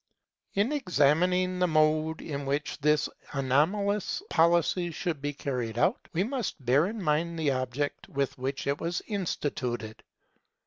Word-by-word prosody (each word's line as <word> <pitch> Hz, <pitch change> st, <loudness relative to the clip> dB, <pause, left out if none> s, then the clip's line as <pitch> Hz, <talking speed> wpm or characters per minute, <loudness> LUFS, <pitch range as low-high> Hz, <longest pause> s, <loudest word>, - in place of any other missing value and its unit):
In 205 Hz, +7 st, +2 dB
examining 180 Hz, -, +2 dB
the 180 Hz, -, +3 dB
mode 155 Hz, 0 st, +2 dB
in 140 Hz, -3 st, -4 dB
which 145 Hz, +2 st, -2 dB
this 150 Hz, 0 st, +3 dB, 0.3 s
anomalous 185 Hz, -, +1 dB
policy 170 Hz, +1 st, +3 dB
should 165 Hz, -2 st, -3 dB
be 145 Hz, +1 st, -1 dB
carried 125 Hz, -5 st, -3 dB
out, -, -, +1 dB
we 175 Hz, -, +1 dB
must 235 Hz, -, -3 dB
bear 140 Hz, +7 st, +4 dB
in 220 Hz, +2 st, -5 dB
mind 165 Hz, +2 st, +1 dB
the 155 Hz, -3 st, +1 dB
object 130 Hz, +2 st, -2 dB
with 140 Hz, -1 st, -1 dB
which 135 Hz, +2 st, -3 dB
it 140 Hz, +1 st, -1 dB
was 170 Hz, +1 st, -2 dB
instituted. 125 Hz, -, -3 dB
155 Hz, 140 wpm, -28 LUFS, 140-180 Hz, 0.3 s, bear